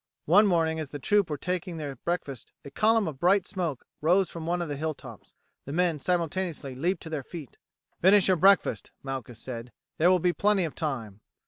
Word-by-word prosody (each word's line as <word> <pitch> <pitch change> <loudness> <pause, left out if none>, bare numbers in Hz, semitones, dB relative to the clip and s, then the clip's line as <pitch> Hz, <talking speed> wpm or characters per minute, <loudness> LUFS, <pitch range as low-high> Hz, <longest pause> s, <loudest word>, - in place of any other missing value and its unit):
One 205 +7 +6
morning 165 -3 +1
as 155 -3 -5
the 145 - -6
troop 200 +5 +2
were 150 - -2
taking 180 +2 -3
their 145 -3 -5
breakfast 140 -4 -4
a 140 - -9
column 220 +5 +3
of 145 -4 -6
bright 185 +3 +3
smoke 175 - -3 0.2
rose 180 +4 +3
from 165 -1 -7
one 175 +1 0
of 175 - -2
the 145 - -3
hill 155 +2 -2
tops. - - -13 0.3
The 140 - -6
men 170 -2 +1
simultaneously 170 -3 -2
leaped 170 +9 -1
to 165 - -7
their 155 -3 -2
feet. 150 -1 -10 0.4
"Finish 195 +2 +6
your 185 -1 +3
breakfast," 195 +3 +3
Malchus 130 -4 -6
said, 120 0 -7 0.3
"there 170 +3 +5
will 185 - +5
be 180 0 +1
plenty 205 -1 +2
of 155 - -5
time. 115 - -4
165 Hz, 205 wpm, -27 LUFS, 140-185 Hz, 0.4 s, One